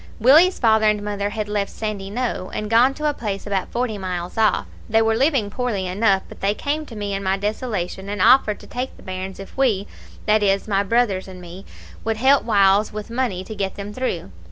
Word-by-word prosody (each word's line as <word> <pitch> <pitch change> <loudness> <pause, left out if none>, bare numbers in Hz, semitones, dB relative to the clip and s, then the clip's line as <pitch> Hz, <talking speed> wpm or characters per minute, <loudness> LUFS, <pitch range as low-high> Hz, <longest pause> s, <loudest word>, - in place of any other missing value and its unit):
"Willie's 310 - +6
father 220 -2 +4
and 210 -1 0
mother 205 -1 -2
had 210 0 -4
left 205 -1 -1
Sandyknowe, 210 0 -3
and 215 0 -4
gone 250 +4 +5
to 305 0 -1
a 295 - +1
place 205 -7 -4
about 200 -2 -2
forty 235 -3 -2
miles 180 -2 -4
off. 220 -1 +2 0.2
They 225 0 +4
were 225 0 +2
living 260 -5 +1
poorly 235 -6 -2
enough, 195 +1 +2
but - - -13
they 200 +1 +1
came 300 +4 -2
to 230 - -10
me 205 -1 -3
in 195 - -2
my 190 0 0
desolation, 200 -2 -3
and 205 0 -4
offered 210 +1 +5
to - - -12
take 255 +2 -5
the - - -16
bairns 190 0 -6
if 195 - -10
we 230 -8 +1 0.4
that 215 0 +3
is, 195 0 +1
my 200 -2 +2
brothers 200 -2 +1
and 185 -1 -10
me 180 +2 -11 0.4
would 225 -1 -1
help 265 +4 +4
whiles 200 -1 +3
with 215 +1 -7
money 235 -7 -1
to 220 - -8
get 195 -2 -3
them 205 +1 -7
through. 195 - -3
210 Hz, 215 wpm, -22 LUFS, 195-235 Hz, 0.4 s, Willie's